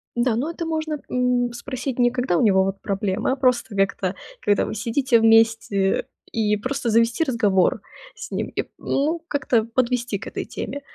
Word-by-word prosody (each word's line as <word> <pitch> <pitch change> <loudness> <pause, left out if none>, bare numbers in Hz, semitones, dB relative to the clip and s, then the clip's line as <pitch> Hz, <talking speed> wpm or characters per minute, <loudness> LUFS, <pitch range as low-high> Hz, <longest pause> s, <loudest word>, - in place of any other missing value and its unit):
Да, 240 -1 +1
но 275 +8 -1
это 335 0 -5
можно, 315 -1 -2
м, 250 -1 +1
спросить 255 +1 -5
не 245 -1 +4
когда 250 -7 0
у - - +2
него, 190 -4 +4
вот, 195 0 -3
проблемы, 195 +1 -1
а - - -1
просто 250 -5 +1
как-то, 195 -1 0 0.3
когда 205 -1 +2
вы - - -4
сидите 235 +3 +2
вместе, 225 -3 +3 0.2
и 210 -2 +1
просто 255 +4 -3
завести 230 +7 +3
разговор 210 - +2 0.3
с - - -9
ним. - - -2
И, - - -3
ну, 310 +5 0
как-то 250 -6 +1
подвести 240 -2 -1
к - - -10
этой - - -4
теме. 285 - -5
235 Hz, 175 wpm, -23 LUFS, 210-260 Hz, 0.3 s, не